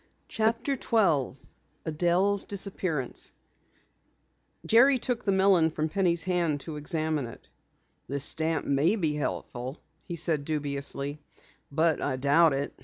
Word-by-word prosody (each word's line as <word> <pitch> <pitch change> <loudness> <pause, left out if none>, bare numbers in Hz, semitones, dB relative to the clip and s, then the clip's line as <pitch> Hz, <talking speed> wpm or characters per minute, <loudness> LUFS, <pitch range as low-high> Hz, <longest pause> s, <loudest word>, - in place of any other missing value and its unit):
CHAPTER 230 +5 0
12 165 - +1 0.5
ADELLE'S 175 +5 +1
DISAPPEARANCE 185 -8 -3 1.3
Jerry 245 +9 +6
took 245 -1 -2
the 200 - +1
melon 190 -4 +4
from 155 0 -2
Penny's 175 -2 +2
hand 170 -5 0
to 160 +1 -7
examine 155 -3 -1
it. 115 - -13 0.6
"This 140 +1 -2
stamp 160 +1 0
may 145 +9 +2
be 160 -8 0
helpful," 130 -2 -4 0.2
he 170 - -6
said 160 -3 0
dubiously, 145 -1 -2 0.5
"but 160 +2 +2
I 145 - -1
doubt 145 +4 +4
it. 140 +1 -2
160 Hz, 120 wpm, -28 LUFS, 145-190 Hz, 1.3 s, Jerry